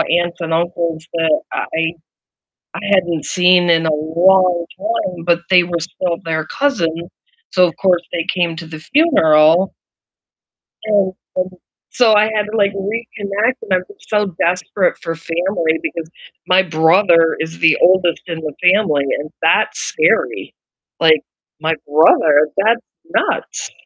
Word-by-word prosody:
aunts 175 Hz, +1 st, 0 dB
and 165 Hz, -1 st, -2 dB
uncles 170 Hz, -1 st, -2 dB
that 160 Hz, -2 st, +1 dB
I -, -, -3 dB, 0.2 s
I 165 Hz, -, +1 dB, 0.9 s
I -, -, -5 dB
hadn't 175 Hz, -5 st, 0 dB
seen 180 Hz, -1 st, +3 dB
in 165 Hz, -1 st, +3 dB
a 160 Hz, -, +1 dB
long 170 Hz, +3 st, +2 dB
time, 310 Hz, -, -3 dB
but 170 Hz, -1 st, +2 dB
they 180 Hz, -2 st, +5 dB
were 170 Hz, -1 st, -3 dB
still 175 Hz, 0 st, -3 dB
their 160 Hz, -1 st, -2 dB
cousin, 170 Hz, -, -1 dB, 0.4 s
so 180 Hz, -1 st, +4 dB
of 165 Hz, -, -7 dB
course 180 Hz, -3 st, +1 dB
they 165 Hz, -1 st, -2 dB
came 170 Hz, -3 st, -1 dB
to 170 Hz, -1 st, -8 dB
the 160 Hz, -1 st, -9 dB
funeral 165 Hz, -, +3 dB, 1.1 s
and, 200 Hz, -3 st, +1 dB, 0.2 s
um, 185 Hz, -, 0 dB, 0.4 s
so 230 Hz, -3 st, +3 dB
I 210 Hz, 0 st, +5 dB
had 215 Hz, -1 st, 0 dB
to, 225 Hz, -, -3 dB
like, 200 Hz, -1 st, +2 dB
reconnect, 210 Hz, +2 st, -2 dB
and 200 Hz, -4 st, -3 dB
I'm 185 Hz, -, +1 dB, 0.2 s
so 210 Hz, -3 st, -1 dB
desperate 180 Hz, +2 st, 0 dB
for 165 Hz, -1 st, -4 dB
family 165 Hz, 0 st, -2 dB
because 165 Hz, -1 st, -5 dB, 0.4 s
my 185 Hz, +1 st, +4 dB
brother 165 Hz, 0 st, +3 dB
is 160 Hz, +1 st, -5 dB
the 160 Hz, -2 st, +4 dB
oldest 180 Hz, -2 st, +3 dB
in 165 Hz, -2 st, -5 dB
the 155 Hz, -2 st, -6 dB, 0.2 s
family, 160 Hz, -9 st, +1 dB, 0.2 s
and 150 Hz, +1 st, -7 dB
that's -, -, +2 dB
scary, -, -, 0 dB, 0.5 s
like, 160 Hz, -2 st, +4 dB, 0.4 s
my 160 Hz, 0 st, 0 dB
brother? 150 Hz, 0 st, +4 dB
That's 230 Hz, +4 st, +2 dB, 0.3 s
nuts. -, -, -2 dB
175 Hz, 145 wpm, -17 LUFS, 165-190 Hz, 1.1 s, they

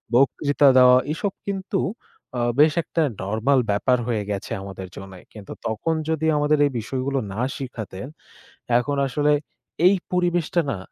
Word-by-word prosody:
বক্তৃতা 140 Hz, +2 st, +3 dB
দেওয়া, 125 Hz, 0 st, +7 dB
এসব 195 Hz, +5 st, -2 dB
কিন্তু 195 Hz, 0 st, -2 dB, 0.6 s
আ -, -, 0 dB, 0.2 s
বেশ 150 Hz, +1 st, +6 dB
একটা 165 Hz, -, -2 dB, 0.2 s
নরমাল 110 Hz, +8 st, +1 dB
ব্যাপার 125 Hz, +5 st, +2 dB
হয়ে 110 Hz, -4 st, -1 dB
গেছে 100 Hz, -, -5 dB
আমাদের 95 Hz, -1 st, -8 dB
জন্যে। 95 Hz, -2 st, -10 dB
কিন্তু 105 Hz, -3 st, -9 dB
তখন 115 Hz, +9 st, -1 dB, 0.2 s
যদি 160 Hz, 0 st, 0 dB
আমাদের 150 Hz, +1 st, +2 dB
এই 145 Hz, -, 0 dB
বিষয়গুলো 130 Hz, +4 st, -2 dB
না 115 Hz, -, -3 dB, 0.2 s
শিখাতেন, 120 Hz, -4 st, -7 dB, 0.7 s
এখন 140 Hz, +3 st, -2 dB
আসলে 145 Hz, +3 st, +1 dB, 0.5 s
এই 195 Hz, -, +6 dB, 0.2 s
পরিবেশটা 175 Hz, -1 st, +1 dB
না -, -, -3 dB
135 Hz, 145 wpm, -23 LUFS, 110-155 Hz, 0.7 s, দেওয়া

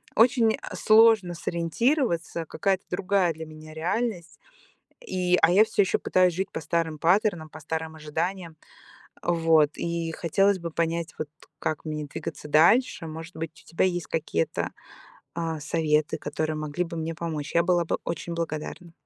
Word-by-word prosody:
очень 230 Hz, -1 st, +4 dB, 0.2 s
сложно 215 Hz, -5 st, +5 dB
сориентироваться, 170 Hz, -, 0 dB
какая-то 195 Hz, +3 st, -1 dB
другая 185 Hz, -2 st, +1 dB
для 160 Hz, +1 st, -8 dB
меня 155 Hz, 0 st, -11 dB
реальность, 180 Hz, +1 st, -2 dB, 0.7 s
и 180 Hz, -1 st, +1 dB
а, 160 Hz, -, +6 dB
я 200 Hz, +4 st, +7 dB
всё 205 Hz, -, +2 dB
ещё -, -, 0 dB
пытаюсь 185 Hz, -1 st, +3 dB
жить 190 Hz, +2 st, -3 dB
по -, -, -4 dB
старым 160 Hz, 0 st, -1 dB
паттернам, 175 Hz, -3 st, +2 dB
по 155 Hz, -, -11 dB
старым 160 Hz, +1 st, -4 dB
ожиданиям. 160 Hz, +2 st, -4 dB, 0.7 s
Вот, 165 Hz, -3 st, +3 dB
и 170 Hz, -1 st, -2 dB
хотелось 195 Hz, +5 st, +2 dB
бы 170 Hz, -1 st, -5 dB
понять, 165 Hz, 0 st, -1 dB
вот 155 Hz, -, -3 dB, 0.3 s
как 155 Hz, 0 st, -2 dB
мне 150 Hz, -1 st, -3 dB
двигаться 150 Hz, +1 st, -7 dB
дальше. 165 Hz, -, +4 dB
Может 160 Hz, +2 st, -8 dB
быть, 160 Hz, 0 st, -4 dB
у -, -, -21 dB
тебя 165 Hz, -, +1 dB
есть 175 Hz, -3 st, -2 dB
какие-то, 150 Hz, -, -1 dB, 0.6 s
а, 165 Hz, -2 st, -2 dB
советы, 155 Hz, 0 st, +1 dB
которые 155 Hz, +1 st, -2 dB
могли 155 Hz, +3 st, -2 dB
бы 170 Hz, 0 st, -7 dB
мне 160 Hz, +1 st, -3 dB
помочь. 155 Hz, -4 st, -4 dB
Я 170 Hz, -, +6 dB
была 175 Hz, -1 st, +2 dB
бы -, -, -1 dB
очень 170 Hz, 0 st, -4 dB
благодарна. 165 Hz, +1 st, -5 dB
170 Hz, 155 wpm, -26 LUFS, 160-180 Hz, 0.7 s, я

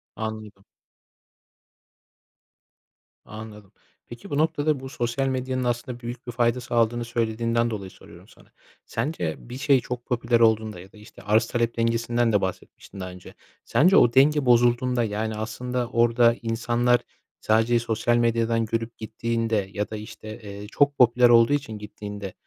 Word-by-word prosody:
Anladım. 110 Hz, -3 st, -7 dB, 2.6 s
Anladım. 105 Hz, -2 st, -11 dB, 0.4 s
Peki, 120 Hz, 0 st, -11 dB
bu 145 Hz, -, -2 dB
noktada, 150 Hz, -1 st, +1 dB
bu 130 Hz, 0 st, -8 dB
sosyal 120 Hz, +2 st, -2 dB
medyanın 130 Hz, 0 st, -2 dB
aslında 120 Hz, 0 st, -3 dB
büyük 120 Hz, +1 st, -8 dB
bir -, -, -3 dB
fayda 120 Hz, +1 st, +1 dB
sağladığını 120 Hz, -1 st, 0 dB
söylediğinden 115 Hz, 0 st, 0 dB
dolayı 100 Hz, -4 st, -6 dB
soruyorum -, -, -16 dB
sana. -, -, -21 dB, 0.3 s
Sence 115 Hz, -, -3 dB
bir 120 Hz, +1 st, -9 dB
şey 140 Hz, -1 st, +3 dB
çok 120 Hz, 0 st, -6 dB
popüler 120 Hz, -2 st, +1 dB
olduğunda 110 Hz, -4 st, +2 dB
ya 95 Hz, +2 st, -13 dB
da, -, -, -18 dB
işte, 105 Hz, -, -15 dB
arz 110 Hz, +2 st, +2 dB
talep 120 Hz, 0 st, -1 dB
dengesinden 115 Hz, 0 st, +1 dB
de 100 Hz, -, +3 dB
bahsetmiştin, 95 Hz, +1 st, -6 dB
daha 95 Hz, -1 st, -5 dB
önce. 90 Hz, 0 st, -13 dB, 0.3 s
Sence 185 Hz, +6 st, +4 dB
o 120 Hz, -, +5 dB
denge 145 Hz, +2 st, +4 dB
bozulduğunda, 120 Hz, 0 st, +3 dB
yani, 110 Hz, 0 st, -2 dB
aslında 120 Hz, +3 st, -3 dB
orada 120 Hz, -1 st, +3 dB
insanlar 120 Hz, +1 st, +1 dB, 0.4 s
sadece 115 Hz, +2 st, +2 dB
sosyal 115 Hz, +1 st, 0 dB
medyadan 115 Hz, -1 st, +1 dB
görüp 115 Hz, +1 st, -3 dB
gittiğinde 110 Hz, -2 st, -2 dB
ya 105 Hz, 0 st, -3 dB
da, 110 Hz, -, -6 dB
işte, 110 Hz, +1 st, -9 dB
eee, 100 Hz, -1 st, -9 dB
çok 140 Hz, +5 st, +1 dB
popüler 120 Hz, 0 st, +5 dB
olduğu 115 Hz, +3 st, +5 dB
için 130 Hz, -7 st, -2 dB
gittiğinde 105 Hz, -2 st, -8 dB
115 Hz, 145 wpm, -24 LUFS, 110-120 Hz, 2.6 s, o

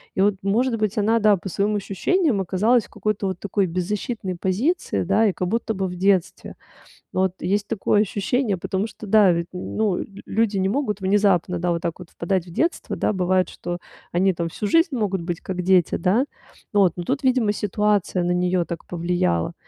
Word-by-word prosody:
И -, -, +1 dB
вот, 205 Hz, 0 st, +3 dB
может 230 Hz, +5 st, +1 dB
быть, 215 Hz, -2 st, -1 dB
она, 225 Hz, +3 st, +3 dB
да, 210 Hz, -2 st, +4 dB
по 195 Hz, -, -7 dB
своим 205 Hz, +4 st, 0 dB
ощущениям 215 Hz, -, 0 dB
оказалась 210 Hz, +6 st, +2 dB
в -, -, -19 dB
какой-то 215 Hz, -1 st, -2 dB
вот 185 Hz, -2 st, -4 dB
такой 200 Hz, 0 st, 0 dB
беззащитной 185 Hz, +2 st, -3 dB
позиции, 225 Hz, -, 0 dB
да, 200 Hz, +5 st, +3 dB
и 200 Hz, -, +1 dB
как 180 Hz, -, -2 dB
будто 225 Hz, +2 st, -1 dB
бы 190 Hz, -1 st, -2 dB
в 180 Hz, -, -6 dB
детстве. 190 Hz, -1 st, 0 dB, 0.6 s
Вот 190 Hz, -1 st, +1 dB
есть 200 Hz, +3 st, 0 dB
такое 210 Hz, -1 st, +2 dB
ощущение, 210 Hz, +2 st, 0 dB
потому 190 Hz, +4 st, -2 dB
что 215 Hz, -, -11 dB
да, 205 Hz, -3 st, +6 dB
ведь, 170 Hz, 0 st, -2 dB
ну, 190 Hz, +2 st, -1 dB
лю -, -, -4 dB, 0.2 s
люди 215 Hz, -1 st, 0 dB
не 190 Hz, 0 st, +1 dB
могут 215 Hz, -4 st, -1 dB
внезапно, 190 Hz, -2 st, +2 dB
да, 175 Hz, 0 st, +1 dB
вот 170 Hz, -, -3 dB
так 170 Hz, +1 st, -3 dB
вот 175 Hz, -, -11 dB
впадать 180 Hz, +1 st, -2 dB
в 175 Hz, -, -11 dB
детство, 330 Hz, -, -1 dB
да, -, -, 0 dB
бывает, 185 Hz, -1 st, +1 dB
что 175 Hz, 0 st, -5 dB, 0.3 s
они 190 Hz, +2 st, +3 dB
там 170 Hz, 0 st, -2 dB
всю 205 Hz, +5 st, -4 dB
жизнь 330 Hz, -2 st, +3 dB
могут 195 Hz, -6 st, -1 dB
быть 175 Hz, 0 st, -4 dB
как 180 Hz, -1 st, -4 dB
дети, 185 Hz, -2 st, +3 dB
да, 205 Hz, +10 st, +2 dB, 0.5 s
вот, 195 Hz, -5 st, +4 dB
но 175 Hz, -, -4 dB
тут, 275 Hz, +6 st, -1 dB
видимо, 250 Hz, -5 st, +3 dB
ситуация 205 Hz, -3 st, 0 dB
на 175 Hz, -, 0 dB
неё 180 Hz, 0 st, +1 dB
так 170 Hz, -1 st, -7 dB
повлияла. 170 Hz, -, -1 dB
195 Hz, 200 wpm, -23 LUFS, 180-215 Hz, 0.6 s, да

